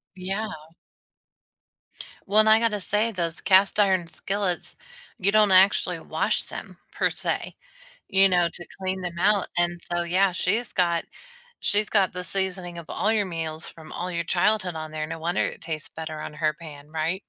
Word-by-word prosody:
Yeah. 195 +4 -3 1.8
Well, 205 +2 +4
and 215 0 +6
I 220 0 +7
gotta 225 -2 +1
say 210 +4 +1
those 170 -5 -2
cast-iron 190 -2 +4
skillets, 190 +1 -2 0.4
you 195 +1 +1
don't 210 -1 +5
actually 190 +2 +5
wash - - -1
them - - -8
per - - +1
se, - - -2 0.5
you 195 0 +5
know, 175 -2 +3
to 175 +1 -7
clean 190 0 -2
them 175 -1 -5
out. 200 +1 +3
And 175 0 0
so, 175 0 -2
yeah, 185 +3 +2
she's 205 +6 0
got 170 -2 +1 0.6
she's 210 +1 +2
got 195 -4 +3
the 180 0 -5
seasoning 185 -2 -3
of 165 - -9
all 215 - 0
your 210 -3 +1
meals 160 -2 -4
from 160 -1 -12
all 180 +1 -4
your 170 -1 -2
childhood 185 +1 +1
on 155 0 -5
there. 155 0 -3
No 160 - -6
wonder 170 +2 0
it - - -7
tastes 155 -3 -5
better 155 -1 -6
on - - -6
her 155 0 0
pan, 150 -2 -11
right? 160 +5 -2
180 Hz, 175 wpm, -25 LUFS, 170-195 Hz, 1.8 s, I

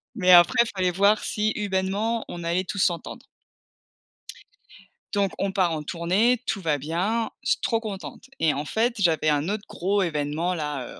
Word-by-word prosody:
Mais 185 -5 +3
après 175 +6 +7
fallait 185 -1 +1
voir 200 +4 +3
si 215 0 -1
humainement 205 +3 -1
on 175 -1 -7
allait 170 +3 0
tous 200 - -5
s'entendre. 175 -2 -1 1.9
Donc 200 -2 +1
on 195 0 -1
part 185 -4 +1
en 155 - -4
tournée, 190 +10 +1
tout 205 - -1
va 155 -5 0
bien, 190 - -1
je - - 0
suis - - +2
trop 225 -2 +1
contente 220 +5 -8
et 155 -2 +2
en 145 +2 -3
fait, 235 +6 0
j'avais 160 -5 +2
un 150 +1 +1
autre 205 +1 -2
gros 195 +3 0
évènement 160 +1 -1
là, 150 -6 -4
185 Hz, 170 wpm, -25 LUFS, 165-210 Hz, 1.9 s, après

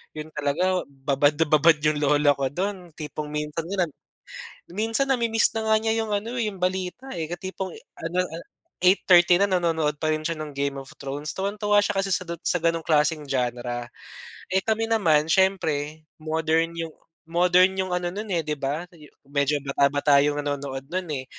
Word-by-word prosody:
Yun 155 +1 -7
talaga 180 +6 0
babad 140 +1 +1
na 165 +2 +2
babad 155 +2 +6
yung 150 -1 +2
lola 145 0 +4
ko 135 -1 -1
dun. 180 +1 -4
Tipong 150 -1 -6
minsan 150 +2 -3
nga 190 0 0
nag - - -14 0.9
minsan 225 +6 +1
na-mi-miss 235 -4 +2
na 220 0 -1
nga - - +6
niya 225 0 0
yung 215 - -5
ano, 220 +4 -2
eh, 230 -3 0
yung 190 - -12
balita, 185 +7 -2
eh, 160 -2 -3
tipong 190 +1 -5 0.2
ano, 165 +2 -4
ah, 165 +2 -8 0.4
8:30 180 -1 +6
na - - +5
nanonood 165 -5 +1
pa 155 - 0
rin 155 0 -2
siya 165 +1 -1
ng 150 -1 -6
"Game 140 0 -1
of 135 - -11
Thrones." 145 +2 -5
Tuwang-tuwa 205 +2 0
siya 205 - 0
kasi 195 0 0
sa 185 - +1
dut 170 -1 -6
sa - - +2
ganong 165 -1 +1
klaseng 155 -1 +2
genre. 120 -2 -2 0.7
Eh, 190 - +3
kami 225 0 0
naman 165 -10 +3
siyempre 160 -5 +1
modern 160 +1 0
yung 165 -1 -4 0.4
modern 180 +2 +5
yung 185 -1 -1
ano 175 0 -1
nun, 210 +4 -5
eh, 170 -2 +1
'di 150 -1 -3
ba, 145 +5 -2
sa 175 - -19
jo 150 - -14 0.2
medyo 145 +1 +1
bata-bata 140 +1 +3
yung 145 0 0
nanonood 140 -2 -3
nun, 185 +1 -2
eh. 130 -2 -4
165 Hz, 190 wpm, -25 LUFS, 150-185 Hz, 0.9 s, babad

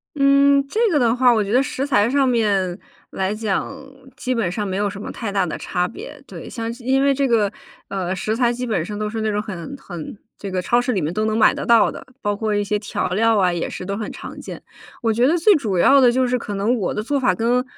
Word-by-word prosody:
嗯， 280 0 +4
这 425 - -3
个 300 - +3
的 235 -3 +3
话， 250 0 +5
我 215 - +2
觉 200 +2 -3
得 255 - +5
食 270 0 -3
材 230 -5 +2
上 275 0 +2
面 200 -7 +1 0.3
来 190 +2 -1
讲， 215 +2 -2 0.5
基 255 0 -2
本 225 -8 -1
上 205 +2 -3
没 190 - -3
有 205 +1 0
什 200 0 -8
么 - - -6
太 225 -4 -5
大 195 -2 +1
的 160 - -4
差 180 0 -1
别， 290 +9 -10
对。 - - -9
像 230 -1 -4
是 240 0 -14
因 265 +2 +2
为 280 0 +4
这 275 0 +1
个， 220 -5 +2 0.4
呃， 190 -1 -2
食 215 +4 -2
材 240 -1 +2
基 245 +1 -4
本 205 -9 -1
上 205 +3 -6
都 210 0 -2
是 220 0 -4
那 220 - 0
种 205 - -1
很 210 +6 -7
很 175 - -8 0.2
这 200 - -6
个 185 -1 -2
超 240 +5 +2
市 250 +1 -1
里 195 - 0
面 155 +2 -2
都 215 +3 -1
能 220 0 0
买 220 - +5
得 - - -5
到 235 -1 +5
的， - - -10 0.2
包 205 -1 -1
括 215 0 -1
一 205 - +1
些 210 +1 -1
调 205 - -3
料 220 +3 +2
啊， 180 -2 +2
也 170 - -2
是 180 - -7
都 200 +1 -3
很 215 0 -5
常 - - -9
见。 - - -8 0.4
我 225 -1 +2
觉 240 +3 +3
得 335 +4 +3
最 405 +6 +5
主 215 - -1
要 275 +10 +6
的 245 -2 +6
就 255 +1 +1
是 250 0 0
可 205 -3 -5
能 210 +5 +1
我 205 -7 -2
的 210 - -3
做 280 +5 0
法 255 -2 +2
跟 240 +2 +1
220 Hz, 290 characters per minute, -21 LUFS, 200-250 Hz, 0.5 s, 要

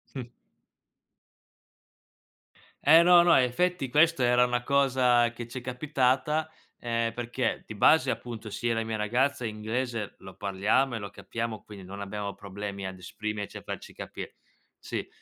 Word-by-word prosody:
Mh. 130 - -3 2.6
E 160 +3 +8
no, 175 0 +7
no, 175 - +5
effetti 135 +5 +1
questa 150 -2 +4
era 125 0 +5
una 125 -1 0
cosa 125 -3 +3
che 120 0 -8
ci 130 +2 -6
è - - -13
capitata 135 +4 0 0.3
e, 115 -1 -1
perché 120 +1 -2
di 110 - -8
base, 160 +9 +5
appunto, 115 -3 -6
sia 120 +3 -1
la 115 0 -1
mia 110 0 -3
ragazza 125 +5 0
inglese 110 +1 -3
lo 95 -1 -12
parliamo 105 +6 +1
e - - -3
lo 100 -1 -6
capiamo, 115 +1 -5
quindi 100 -3 -11
non 100 +2 -8
abbiamo 100 0 -4
problemi 100 0 -6
ad 95 0 -6
esprimerci 105 +3 -5
a - - -6
farci - - -7
capire. - - -8 0.4
Sì. - - -5
120 Hz, 150 wpm, -28 LUFS, 105-130 Hz, 2.6 s, E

